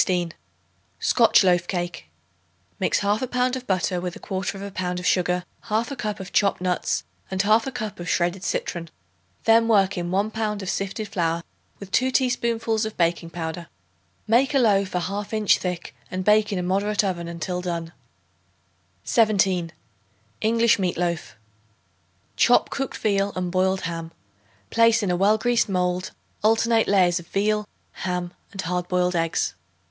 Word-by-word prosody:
Scotch 230 -3 +4
Loaf 175 -1 +3
Cake. 175 -2 -4 0.7
Mix - - +1
1/2 210 +5 0
pound 250 0 +1
of 255 -1 -7
butter 185 -1 0
with 180 -1 -4
1/4 195 +1 -4
pound 180 -1 -2
of 180 - -7
sugar, 180 -1 +1 0.2
1/2 230 +6 -1
cup 210 -4 -4
of 190 -1 -8
chopped 200 -2 +2
nuts 180 -1 -1 0.3
and 190 - -3
1/2 220 +5 +3
cup 215 -5 -5
of 175 - -5
shredded 175 +2 0
citron; 170 -3 -3 0.5
then 225 0 +5
work 195 -5 +3
in 175 0 -3
1 200 +4 0
pound 215 -2 -2
of 190 - -2
sifted 200 +2 -3
flour 170 -3 -1 0.3
with 200 -1 -10
2 260 +6 +3
teaspoonfuls 235 -4 +1
of 220 0 -4
baking 170 -1 +1
powder. 165 +1 -5 0.6
Make 250 +6 +3
a - - +6
loaf 200 -6 +2
a 180 - +1
half 200 +4 -4
inch 215 -2 +3
thick 180 -2 -4
and 185 0 -4
bake 210 0 +4
in 200 - -1
a 180 - -1
moderate 200 +3 +1
oven 175 -3 -2
until 170 +2 -4
done. 170 -2 -4 1.1
17. 190 -6 +2 0.7
English 230 0 +3
Meat 185 -2 -1
Loaf. 170 -2 -2 1.0
Chop - - +4
cooked 270 -1 -3
veal 200 -1 +1
and 180 -1 -2
boiled 190 +1 +1
ham; 165 -1 -5 0.6
place 230 -1 +4
in 190 - +1
a - - +2
well 200 +4 +4
greased 240 0 +1
mold 180 0 0 0.3
alternate 225 +1 +3
layers 180 -3 +3
of 170 - -13
veal, 210 +2 0 0.3
ham 180 -1 -2 0.2
and 195 -3 -4
hard 180 0 -2
boiled 180 0 +1
eggs. 165 -1 0
195 Hz, 155 wpm, -24 LUFS, 180-215 Hz, 1.1 s, a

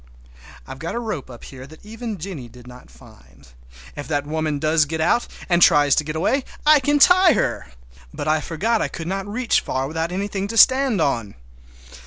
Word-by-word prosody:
I've 135 - -10
got 165 +6 -5
a - - -2
rope 215 - -5
up 120 -2 -12
here 130 -1 -11
that 155 +6 -17
even 225 0 -7
Jennie 160 -8 -8
did 125 +1 -16
not 125 - -14
find. 60 +2 -19 0.5
If 145 - -7
that 145 -2 -2
woman 155 0 -2
does 155 +1 +2
get 160 +2 -5
out, 235 +9 +1 0.2
and 175 -1 +1
tries 145 -3 +5
to 150 - +2
get 155 +1 -6
away, 260 - 0 0.2
I 305 0 +6
can 290 +2 +1
tie 360 +3 +6
her! 215 - -2 0.4
But - - -6
I 155 0 +1
forgot 215 +9 -1
I - - 0
could 165 - -8
not 195 +3 -4
reach 230 +3 0
far 130 +1 -3
without 160 +3 -3
anything 195 +1 -3
to 230 +2 -5
stand 260 -5 +4
on! 115 -8 -2
160 Hz, 200 wpm, -21 LUFS, 145-220 Hz, 0.5 s, I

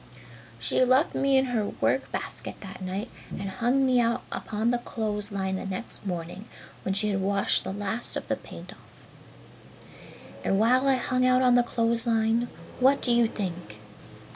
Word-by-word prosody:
"She 115 - +2
left 260 +5 +3
me 275 -1 +3
in 265 - +4
her 245 -4 0 0.2
work - - +1
basket - - -4
that 190 -1 -9
night 190 +5 -4 0.3
and 195 - -5
hung 245 +7 +2
me 255 -1 +4
out 235 0 0
upon 220 +2 -1
the 245 - +1
clothes 210 -3 -3
line 190 -1 -1
the - - -5
next 190 +4 -6
morning 175 +3 -5 0.4
when 190 - -2
she 210 +1 +2
had 195 -1 0
washed 200 +1 +2
the - - -4
last 205 +4 -2
of - - -6
the - - +1
paint - - -10
off. - - -21 1.4
"And 195 - +2
while 255 +5 +4
I 270 - +5
hung 255 0 0
out 255 0 +4
on 250 -1 +5
the 245 - +6
clothes 230 -1 0
line, 225 +1 +2 0.3
what 265 +2 +5
do 245 - +1
you 235 -1 +4
think?" 180 - -5
225 Hz, 180 wpm, -27 LUFS, 195-245 Hz, 1.4 s, the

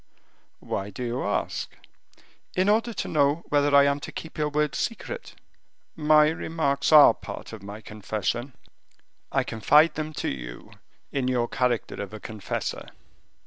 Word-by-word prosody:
"Why 100 +1 -3
do 105 +5 -6
you 120 +2 -2
ask?" 100 +1 -2 0.9
"In 185 +2 +2
order 225 +3 +2
to - - -4
know 145 +2 +2
whether 145 -1 +3
I 140 - +8
am 140 0 +1
to - - -8
keep 160 - -8
your 150 0 +1
words 150 -3 0
secret." 470 - -4 0.6
"My 150 0 +5
remarks 155 -3 -1
are 150 -2 +9
part - - -9
of 110 - -8
my 100 +2 -8
confession; 110 +4 -3 0.8
I - - +2
confide 150 +9 +4
them 155 0 -4
to - - -3
you - - -7 0.4
in 135 -2 -1
your 125 -2 +1
character 120 -1 -1
of 100 +1 -6
a - - -8
confessor." 105 -1 -5
140 Hz, 150 wpm, -26 LUFS, 110-150 Hz, 0.9 s, are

